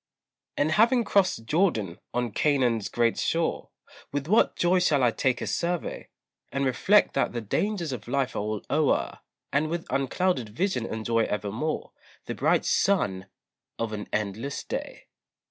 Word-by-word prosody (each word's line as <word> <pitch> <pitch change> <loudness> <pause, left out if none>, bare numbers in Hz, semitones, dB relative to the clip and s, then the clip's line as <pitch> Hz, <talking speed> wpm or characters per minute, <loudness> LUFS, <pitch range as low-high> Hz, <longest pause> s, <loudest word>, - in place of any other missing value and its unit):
And 150 +2 +2
having 235 +7 +4
crossed 190 - +1
Jordan, 115 - +1
on 120 -2 -1
Canaan's 125 -5 +1
bright 115 -1 +1
shore 165 0 -1 0.4
With 140 0 -2
what 215 +6 +3
joy 180 +1 +3
shall 150 -7 +3
I 120 - +4
take 130 +2 0
a - - -2
survey, 175 0 -2 0.4
And 140 0 0
reflect 190 +11 +3
that - - 0
the 120 - -2
dangers 175 - -1
of 120 -4 -6
life 135 +1 -1
are - - -1
all 105 0 -3
o'er, 150 +1 +1 0.3
And 150 +2 +2
with 170 +1 -3
unclouded 135 -1 0
vision 125 - -1
enjoy 115 +1 0
evermore 105 +9 -3 0.3
The - - -4
bright - - +2
sun 190 - +1 0.5
of 115 -1 -3
an 105 -1 -5
endless 110 +7 -3
day. - - -6
140 Hz, 150 wpm, -27 LUFS, 115-175 Hz, 0.5 s, having